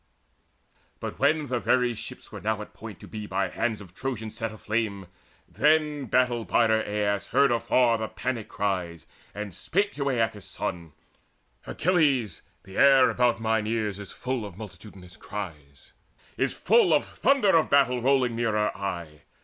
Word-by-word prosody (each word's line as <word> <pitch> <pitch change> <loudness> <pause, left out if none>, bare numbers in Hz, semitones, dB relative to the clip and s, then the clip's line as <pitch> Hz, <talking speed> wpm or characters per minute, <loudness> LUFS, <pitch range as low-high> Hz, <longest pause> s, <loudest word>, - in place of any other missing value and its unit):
But - - -6
when 150 +2 +2
the 125 -3 -1
very 125 0 +2
ships - - -10
were - - -8
now 110 0 -1
at - - -16
point 110 -3 -10
To - - -11
be 105 -1 -7
by 95 -1 -1
hands 110 +1 -2
of 90 -3 -13
Trojans 110 -2 -5
set 115 -1 -3
aflame, 110 -2 -2 0.4
Then 150 -1 +2
battle 120 0 +2
bider 110 -1 +3
Aias 105 -1 -1
heard 140 0 +3
afar 120 0 +2
The 110 - -2
panic 115 -3 -4
cries, 90 -5 -2 0.3
and 105 -2 -5
spake 200 - -1
to 140 -1 -1
Aeacus' 110 -6 -1
son: 85 -3 -5 0.7
"Achilles, 145 - +1
all - - -37
the 95 0 -11
air 135 -2 +6
about 120 -2 +2
mine 110 -1 0
ears 110 -3 -1
Is 100 -3 -9
full 125 -2 -3
of 100 -4 -9
multitudinous 100 -4 -11
eries, 75 -9 -8 0.4
is - - 0
full 200 -6 +4
Of 145 - +1
thunder 255 -10 +2
of 160 - +3
battle 125 -3 +3
rolling 130 -2 +2
nearer 110 -2 0
aye. 85 -6 -5
110 Hz, 160 wpm, -26 LUFS, 100-130 Hz, 0.7 s, air